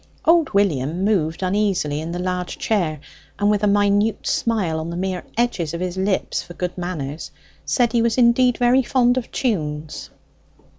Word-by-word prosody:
Old 330 -1 +4
William 170 -2 +1
moved 165 -5 0
uneasily 185 -6 0
in 165 +1 -5
the 175 - -4
large 180 0 -3
chair, 170 -9 -1 0.4
and 205 0 +2
with 205 -1 +1
a 210 - +2
minute 205 +1 +2
smile 195 -9 0
on 160 +1 -5
the 170 - -5
mere 185 -1 -2
edge 240 -3 +1
of 170 0 -3
his 180 0 -3
lips, 190 +1 -1
for 175 - -12
good 180 0 -3
manners, 165 -5 -5 0.4
said 240 -3 +2
he 235 - +2
was 230 0 +1
indeed 245 0 +4
very 245 +2 +4
fond 245 -1 +2
of 255 -2 -3
tunes. 155 - -3
190 Hz, 175 wpm, -21 LUFS, 170-230 Hz, 0.4 s, Old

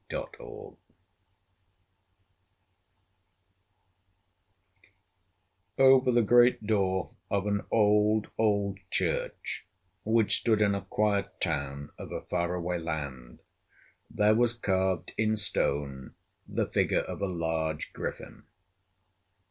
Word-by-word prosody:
Over 130 -1 +6
the 120 -1 +3
great 120 0 +4
door 95 -4 0 0.2
of 100 -1 0
an 100 0 0
old, 105 0 +3
old 100 -3 +1
church - - -2 0.4
which 110 0 +3
stood 110 -3 +2
in 100 -1 +2
a 100 - -2
quiet 100 +1 -1
town 70 -4 -3
of - - -8
a - - -4
far 85 0 -2
away 90 0 -2
land 70 -7 -6 0.7
there 105 0 +3
was 120 +1 +3
carved 95 -5 -1
in 110 0 +2
stone 70 -9 -1 0.3
the - - -1
figure - - +1
of - - -7
a 100 - 0
large 80 -3 -2
griffin. - - -7
100 Hz, 95 wpm, -29 LUFS, 85-110 Hz, 0.7 s, Over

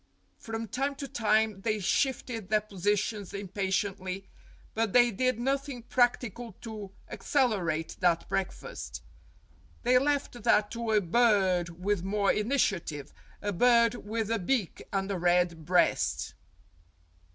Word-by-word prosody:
From 225 0 -5
time 275 +6 -2
to 275 0 -6
time 220 -4 +1
they 215 0 0
shifted 230 0 -1
their 215 0 +3
positions 205 0 -2
impatiently, 195 -1 -2 0.5
but 225 -2 0
they 240 -1 +6
did 255 +2 0
nothing 270 -1 -2
practical 245 -2 0
to 215 -3 -7 0.2
accele 245 -9 +1
rate 160 0 -2
that 170 -2 +2
breakfast. 195 -1 -4 0.8
They 250 +1 +5
left 275 -3 -1
that 205 0 +3
to 230 -1 -4
a 210 - +4
bird 190 -3 +3
with 205 -2 +1
more 200 +1 +2
initiative 195 - -1 0.3
a 205 0 -1
bird 235 +3 +4
with 225 -1 -3
a 230 - +1
beak 205 0 -1
and 195 0 -1
a 190 - -2
red 175 -2 +2
breast. 175 -2 +2
210 Hz, 130 wpm, -29 LUFS, 190-240 Hz, 0.8 s, they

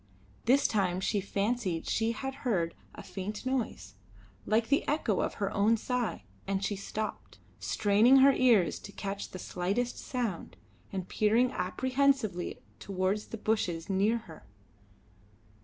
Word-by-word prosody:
This 265 +4 +4
time 185 -4 +1
she 200 +1 0
fancied 200 -3 -1
she 225 +1 +1
had 270 +4 -4
heard 175 -10 0 0.2
a - - -9
faint 205 +4 -6
noise, 245 - -2 0.5
like 225 +1 +2
the 280 - +3
echo 255 - +1
of - - -2
her 200 0 -2
own 215 +3 +3
sigh, 245 - -2 0.2
and 195 0 0
she 205 - -1
stopped, 215 +2 -5 0.2
straining 215 +5 +4
her 270 +1 +7
ears 225 -11 +4
to - - -10
catch 200 0 -5
the - - -8
slightest 195 +8 -2
sound, 235 -9 -4 0.3
and 190 -2 -4
peering 225 +4 +3
apprehensively 255 0 0 0.2
towards 195 +2 -1
the 225 - -6
bushes 190 -6 -1
near 205 +5 +2
her. 175 -9 -12
210 Hz, 140 wpm, -30 LUFS, 190-245 Hz, 0.5 s, her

